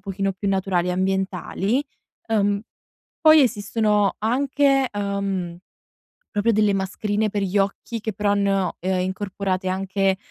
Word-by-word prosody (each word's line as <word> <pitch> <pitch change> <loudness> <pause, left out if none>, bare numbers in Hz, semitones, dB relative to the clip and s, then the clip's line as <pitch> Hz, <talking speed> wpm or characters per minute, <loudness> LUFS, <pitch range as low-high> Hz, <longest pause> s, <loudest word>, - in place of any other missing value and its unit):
pochino 195 0 -2
più 200 +2 -4
naturali 190 -2 0
e - - 0
ambientali. 190 +6 -1 0.4
Uhm, 205 -2 +1 0.6
poi, 310 -1 +8
esistono 210 -3 +1
anche, 270 +3 +2
uhm, 200 -4 -2 0.7
proprio 205 +3 +2
delle 210 -1 +3
mascherine 205 +2 -1
per 205 0 -2
gli 195 +1 0
occhi 200 +3 -2
che, 220 - -2
però, 205 +1 0
hanno, 195 -3 +1
uhm, 185 +1 0
incorporate 190 0 -2
anche, 190 0 0
200 Hz, 130 wpm, -23 LUFS, 190-210 Hz, 0.7 s, poi